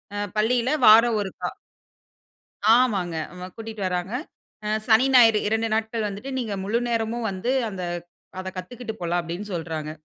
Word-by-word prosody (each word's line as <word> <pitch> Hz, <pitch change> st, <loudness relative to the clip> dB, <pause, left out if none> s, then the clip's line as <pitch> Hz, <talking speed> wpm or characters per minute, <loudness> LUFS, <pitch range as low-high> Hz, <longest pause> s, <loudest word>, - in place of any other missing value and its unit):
அ -, -, -3 dB, 0.2 s
பள்ளியில 240 Hz, +3 st, +2 dB, 0.2 s
வாரம் 225 Hz, +1 st, +7 dB
ஒருக்கா 190 Hz, -, -4 dB, 1.3 s
ஆமாங்க. 200 Hz, -9 st, +1 dB, 0.2 s
வ 180 Hz, -, -6 dB
கூட்டிட்டு 225 Hz, -2 st, -7 dB
வர்றாங்க. 180 Hz, +4 st, -3 dB, 0.5 s
அ -, -, -2 dB, 0.2 s
சனி, 225 Hz, +3 st, +5 dB
ஞாயிறு 225 Hz, -4 st, +7 dB
2 220 Hz, +1 st, +1 dB
நாட்கள் 220 Hz, 0 st, -1 dB
வந்துட்டு, 205 Hz, +7 st, -6 dB
நீங்க 220 Hz, -5 st, -3 dB
முழுநேரமும் 230 Hz, +1 st, -1 dB
வந்து 190 Hz, +7 st, -2 dB, 0.2 s
அந்த 185 Hz, -2 st, -6 dB, 0.6 s
அத 185 Hz, 0 st, -4 dB
கத்துக்கிட்டு 225 Hz, +4 st, -6 dB
போலாம் 175 Hz, +1 st, 0 dB
அப்பிடின்னு 175 Hz, +5 st, -6 dB
சொல்றாங்க. 160 Hz, -2 st, -4 dB
220 Hz, 135 wpm, -24 LUFS, 185-230 Hz, 1.3 s, வாரம்